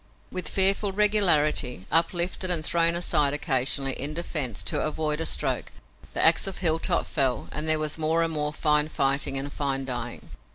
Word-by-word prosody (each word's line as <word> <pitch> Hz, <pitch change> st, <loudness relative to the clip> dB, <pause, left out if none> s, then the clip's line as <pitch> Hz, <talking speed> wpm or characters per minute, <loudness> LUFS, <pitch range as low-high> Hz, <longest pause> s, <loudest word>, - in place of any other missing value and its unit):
With 180 Hz, -3 st, -3 dB
fearful 195 Hz, +1 st, +2 dB
regularity, 170 Hz, -, +1 dB
uplifted 175 Hz, +2 st, 0 dB
and 165 Hz, -3 st, 0 dB
thrown 170 Hz, 0 st, +2 dB
aside 145 Hz, -4 st, +2 dB
occasionally 135 Hz, -1 st, 0 dB
in 145 Hz, +4 st, -5 dB
defense 150 Hz, -9 st, -2 dB
to -, -, -1 dB
avoid 155 Hz, 0 st, -2 dB
a 160 Hz, -, 0 dB
stroke, -, -, -1 dB, 0.4 s
the -, -, +1 dB
ax -, -, +4 dB
of 195 Hz, -, -6 dB
Hilltop 165 Hz, -3 st, +1 dB
fell 130 Hz, -6 st, -1 dB
and 155 Hz, +2 st, -4 dB
there 155 Hz, 0 st, +4 dB
was 155 Hz, +1 st, -2 dB
more 160 Hz, +2 st, +1 dB
and 165 Hz, -1 st, 0 dB
more 150 Hz, -1 st, -1 dB
fine 150 Hz, 0 st, +1 dB
fighting 135 Hz, -2 st, 0 dB
and 140 Hz, +1 st, -4 dB
fine 135 Hz, -2 st, -2 dB
dying. 120 Hz, -2 st, -6 dB
155 Hz, 170 wpm, -25 LUFS, 140-170 Hz, 0.4 s, ax